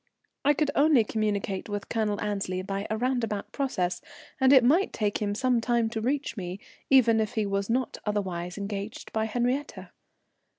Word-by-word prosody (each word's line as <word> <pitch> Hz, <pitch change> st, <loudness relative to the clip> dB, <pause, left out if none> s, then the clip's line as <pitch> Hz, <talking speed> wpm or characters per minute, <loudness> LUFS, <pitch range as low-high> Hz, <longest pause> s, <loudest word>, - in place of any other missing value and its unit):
I 290 Hz, +1 st, +4 dB
could 295 Hz, 0 st, +1 dB
only 290 Hz, -5 st, +5 dB
communicate 210 Hz, -3 st, -2 dB
with 205 Hz, -1 st, -4 dB
Colonel 215 Hz, -3 st, -1 dB
Annesley 195 Hz, -3 st, -2 dB
by 195 Hz, +1 st, -3 dB
a 220 Hz, -, -1 dB
roundabout 230 Hz, -4 st, -1 dB
process, 180 Hz, -11 st, -1 dB, 0.4 s
and 265 Hz, 0 st, +5 dB
it 265 Hz, -3 st, +8 dB
might 325 Hz, +11 st, +3 dB
take 210 Hz, -2 st, -1 dB
him 205 Hz, -1 st, -1 dB
some 250 Hz, 0 st, +2 dB
time 235 Hz, -1 st, +1 dB
to 225 Hz, -1 st, -3 dB
reach 275 Hz, +4 st, -1 dB
me, 185 Hz, -2 st, -5 dB, 0.3 s
even 235 Hz, -4 st, +5 dB
if 220 Hz, +2 st, -1 dB
he 215 Hz, -2 st, +1 dB
was 200 Hz, 0 st, -1 dB
not 250 Hz, +1 st, -1 dB
otherwise 185 Hz, -4 st, -3 dB
engaged 200 Hz, +1 st, -5 dB
by 220 Hz, 0 st, +1 dB
Henriette. 245 Hz, +5 st, -2 dB
220 Hz, 170 wpm, -27 LUFS, 200-250 Hz, 0.4 s, it